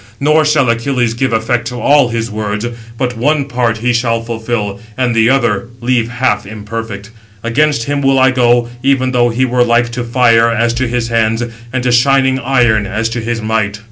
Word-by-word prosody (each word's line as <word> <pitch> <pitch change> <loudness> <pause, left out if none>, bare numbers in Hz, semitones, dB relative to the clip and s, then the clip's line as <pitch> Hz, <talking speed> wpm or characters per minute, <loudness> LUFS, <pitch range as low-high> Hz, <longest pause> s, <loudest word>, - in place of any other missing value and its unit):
Nor 155 +2 +3
shall 150 -3 +2
Achilles 115 0 0
give 130 +1 -1
effect 115 +1 -1
to 125 0 -5
all 140 +1 +3
his 115 -1 -3
words; 105 0 -3 0.3
but 125 -1 -2
one 140 +5 0
part 120 -4 -1
he 120 +2 0
shall 115 -1 0
fulfil, 115 -3 -3 0.2
and 125 -2 0
the 115 0 +3
other 120 -6 +1
leave 120 -1 0
half 125 +2 0
imperfect. 105 0 -7 0.3
Against 140 +2 +1
him 145 +3 -2
will 135 -1 +2
I 130 0 +4
go, 120 -2 +2
even 130 -1 +1
though 120 -1 +2
he 125 +3 0
were 125 -1 +2
like 120 0 +2
to 120 +1 -4
fire 115 -1 +3
as 115 +1 0
to 130 +1 -1
his 120 0 -2
hands; 115 0 +1 0.3
and 130 0 -2
to 125 - +1
shining 130 +2 +3
iron, 120 -5 +1
as 110 +1 -2
to 115 +1 -3
his 115 0 -3
might." 110 -2 -1
120 Hz, 195 wpm, -14 LUFS, 115-130 Hz, 0.3 s, I